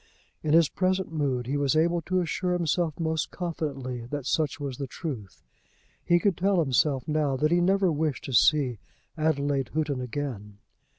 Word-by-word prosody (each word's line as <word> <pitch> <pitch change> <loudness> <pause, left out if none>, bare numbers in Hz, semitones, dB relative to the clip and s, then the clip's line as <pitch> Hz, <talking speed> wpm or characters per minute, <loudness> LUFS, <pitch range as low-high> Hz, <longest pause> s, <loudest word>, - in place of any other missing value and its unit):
In 155 -1 0
his 165 -1 +6
present 185 +2 -1
mood 135 -5 -1
he 140 +4 -1
was 140 0 +1
able 170 +2 +2
to 185 0 +2
assure 180 +2 -1
himself 170 -2 0
most 160 -1 -1
confidently 135 -9 -4
that 145 0 -4
such 150 0 0
was 140 -3 -5
the 140 - -3
truth. 125 - -7 0.6
He 175 - +4
could 195 +1 +2
tell 195 +1 +2
himself 135 -2 +1
now 150 -3 +1
that 155 +3 +1
he 175 0 +4
never 190 0 +3
wished 155 -2 -1
to 135 - -6
see 130 -4 +4 0.4
Adelaide 145 -4 0
Houghton 150 -4 0
again. 120 -6 -5
150 Hz, 170 wpm, -27 LUFS, 135-170 Hz, 0.6 s, his